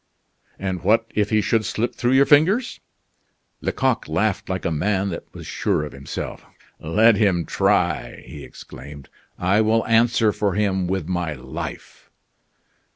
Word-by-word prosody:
"And 95 -2 -4
what 110 +4 +3
if 105 -1 0
he 110 -1 +2
should 110 +2 +1
slip 115 +2 -2
through 120 +1 0
your 135 +1 +5
fingers?" 180 - +3 0.8
Lecoq - - 0
laughed - - -1
like - - -3
a 85 - 0
man 95 +5 0
that 85 - -7
was - - -10
sure - - -1
of 75 - -8
himself. 70 0 -7 0.4
"Let 105 +7 +4
him 95 -6 +2
try," - - 0
he - - -10
exclaimed; 70 0 -12 0.3
"I 95 +4 +2
will 110 +1 +2
answer 115 -1 +3
for 100 -3 -1
him 95 -3 0
with 95 -3 -2
my 90 -3 -2
life." 65 -3 -8
100 Hz, 150 wpm, -22 LUFS, 90-115 Hz, 0.8 s, your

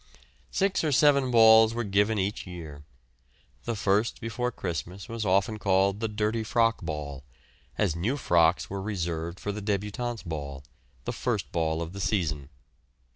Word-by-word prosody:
Six 195 -2 +1
or 155 - +1
seven 140 -1 +4
balls 110 -1 +7
were 120 - -1
given 105 +1 +2
each 100 0 -2
year. 80 -5 -8 0.8
The 115 - -2
first 105 +2 +1
before 120 +2 -2
Christmas 90 0 -5
was 115 -3 -4
often 100 +3 +2
called 95 +1 +2
the 115 - -1
dirty 110 +1 -1
frock 115 0 +1
ball, 75 -4 -5 0.5
as 95 -7 +1
new 110 +12 -1
frocks 85 - +3
were 100 0 -5
reserved 85 -4 -3
for 105 - -3
the 105 +1 -5
débutantes' 105 +3 -3
ball, 70 -4 -5 0.4
the - - -2
first - - -2
ball 80 0 0
of 85 +2 -8
the 100 - -6
season. 80 -9 -1
100 Hz, 155 wpm, -27 LUFS, 85-115 Hz, 0.8 s, balls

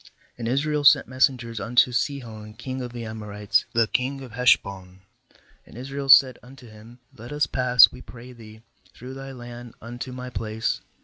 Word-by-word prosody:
19And 115 - -4
Israel 145 +4 -1
sent 140 - +6
messengers 125 -3 0
unto 120 +2 +2
Sihon 110 -3 -4
long 130 +2 -6
of 125 -1 -6
the 120 -1 -7
Amorites, 105 -2 -2
the 115 -1 +3
king 135 +4 -2
of 130 -3 -10
Heshbon; 100 -6 0 0.6
and - - -16
Israel 135 +2 -6
said 130 -2 +7
unto 125 0 -15
him: 110 +2 -15 0.2
Let 120 +4 -11
us 150 0 +1
pass, 125 -2 +5
we 125 - -12
pray 125 +1 -13
thee, 110 -2 -15 0.3
through 125 +2 -10
thy 135 0 -9
land 120 -2 -11
unto 120 +3 -8
my 125 0 -8
place. 110 0 -3
120 Hz, 170 wpm, -24 LUFS, 110-130 Hz, 0.6 s, said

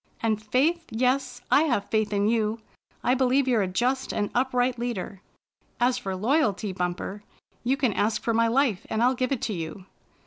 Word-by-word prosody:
And 215 -2 +1
faith, 300 +10 +1
yes, 250 +1 0
I - - +6
have 240 -9 -1
faith 215 -1 +1
in 205 0 +1
you. 220 -1 +1 0.5
I 250 - +3
believe 265 +1 +2
you're 240 -4 +3
a 190 - 0
just 250 +8 0
and 205 -1 -2
upright 250 -1 +1
leader. 215 -5 -4 0.6
As 250 +1 +2
for 195 -6 -4
loyalty. 215 - +1
Bumper, 180 +3 -3 0.4
you 260 +3 +1
can 255 -7 +1
ask 215 +2 +1
for 230 - 0
my 230 +1 +3
life, 235 -5 +1
and 220 +1 0
I'll 250 +2 +4
give 255 0 -1
it 270 - -1
to 215 - -1
you." 170 +2 -6
235 Hz, 185 wpm, -26 LUFS, 210-255 Hz, 0.6 s, I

